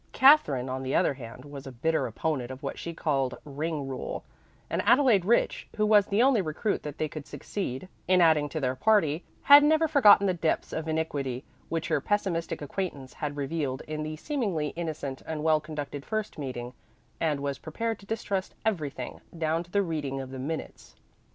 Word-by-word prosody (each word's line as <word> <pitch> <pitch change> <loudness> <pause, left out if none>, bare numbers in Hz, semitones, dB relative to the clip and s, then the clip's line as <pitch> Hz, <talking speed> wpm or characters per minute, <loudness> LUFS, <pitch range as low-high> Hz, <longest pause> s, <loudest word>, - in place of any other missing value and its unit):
Katherine, 205 - +5
on 130 0 -3
the 130 0 -2
other - - +3
hand, 125 0 -10
was 140 -1 -9
a - - -6
bitter 160 +7 0
opponent 140 -6 -2
of 130 0 -8
what - - -4
she 170 - -4
called 140 -5 -1
"ring 150 0 -3
rule," 135 -1 -5 0.4
and - - -1
Adelaide 245 -9 +4
Rich, 235 +4 +2
who 215 - +2
was 210 -2 +5
the 210 +4 +3
only 260 -5 +4
recruit 175 +5 -1
that 150 0 -7
they 155 - 0
could 150 -1 -8
succeed 185 -6 -5 0.2
in 185 0 +5
adding 160 -4 +4
to 155 - -3
their 130 -3 0
party, 175 -5 +3 0.2
had 285 +1 +9
never 315 +2 +4
forgotten 215 -10 +7
the 190 - +2
depths 165 -2 -1
of 160 0 -3
iniquity 145 -5 -2 0.3
which 165 -1 -2
her 155 -3 +2
pessimistic 175 -5 -1
acquaintance 145 -4 -4
had 145 -1 -4
revealed 140 -2 -2
in 155 0 -3
the 155 0 -4
seemingly 190 - -1
innocent 155 -5 -5
and 155 -1 -3
well 155 -1 +4
conducted 145 -2 -6
first 215 -3 -3
meeting, 125 -3 -5 0.5
and 155 -3 +1
was 140 -1 -3
prepared 225 +7 -3
to 200 - -16
distrust 200 -4 -2
everything, 150 - -2 0.2
down 160 0 0
to 175 - -12
the 200 +2 +2
reading 150 -6 -3
of 130 -1 -6
the 130 - -6
minutes. 155 +5 -6
155 Hz, 190 wpm, -28 LUFS, 140-195 Hz, 0.5 s, had